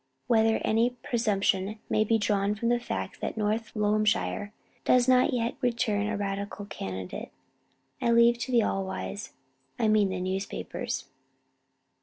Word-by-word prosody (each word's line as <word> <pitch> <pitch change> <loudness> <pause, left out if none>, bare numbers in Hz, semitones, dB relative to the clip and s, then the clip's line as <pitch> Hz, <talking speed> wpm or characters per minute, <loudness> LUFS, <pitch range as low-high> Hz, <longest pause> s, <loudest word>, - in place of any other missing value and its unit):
Whether 225 -1 +3
any 235 +3 +2
presumption 205 -3 0
may 215 - +2
be 225 +1 +2
drawn 205 -1 +1
from 230 +3 -1
the 240 0 +3
fact 95 - -5
that - - -3
North 220 +2 -1
Loamshire 210 -1 +1 0.3
does 250 0 +4
not 255 -1 +5
yet 235 -1 0
return 230 -4 +1
a 215 -1 -1
Radical 200 0 -4
candidate, 95 - -6 0.7
I - - +1
leave 235 0 +5
to 255 - -3
the 235 -2 +4
all 195 -1 0
wise 195 +2 -5 0.4
I 225 - +2
mean 215 -2 +4
the 185 -1 -3
newspapers. 190 +2 -3
215 Hz, 145 wpm, -28 LUFS, 200-235 Hz, 0.7 s, not